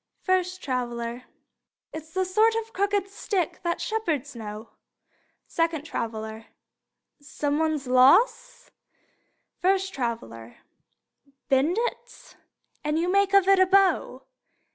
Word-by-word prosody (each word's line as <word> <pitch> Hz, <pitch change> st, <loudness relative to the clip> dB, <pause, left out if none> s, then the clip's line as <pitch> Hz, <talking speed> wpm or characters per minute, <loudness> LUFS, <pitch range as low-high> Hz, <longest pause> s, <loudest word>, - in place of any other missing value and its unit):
First 370 Hz, 0 st, 0 dB
Traveler: 240 Hz, -2 st, -3 dB, 0.7 s
It's 315 Hz, 0 st, -8 dB
the 375 Hz, +2 st, 0 dB
sort 435 Hz, +5 st, +3 dB
of 450 Hz, 0 st, -4 dB
crooked 400 Hz, 0 st, 0 dB
stick 390 Hz, -3 st, -3 dB
that 340 Hz, -1 st, -2 dB
shepherds 320 Hz, -, -2 dB
know. 215 Hz, 0 st, -8 dB, 0.8 s
Second 330 Hz, -3 st, -1 dB
Traveler: 220 Hz, -5 st, -5 dB, 0.7 s
Some 290 Hz, 0 st, -2 dB
one's 315 Hz, -3 st, 0 dB
loss! 470 Hz, -, +3 dB, 0.9 s
First 385 Hz, +1 st, +1 dB
Traveler: 120 Hz, -, -5 dB, 0.9 s
Bend 275 Hz, +8 st, +2 dB
it, 485 Hz, +1 st, -6 dB, 0.5 s
and 300 Hz, +1 st, 0 dB
you 345 Hz, +2 st, 0 dB
make 395 Hz, 0 st, +3 dB
of 390 Hz, -1 st, +5 dB
it 390 Hz, -1 st, +5 dB
a 375 Hz, -, +5 dB
bow. 390 Hz, 0 st, +2 dB
335 Hz, 110 wpm, -25 LUFS, 255-390 Hz, 0.9 s, of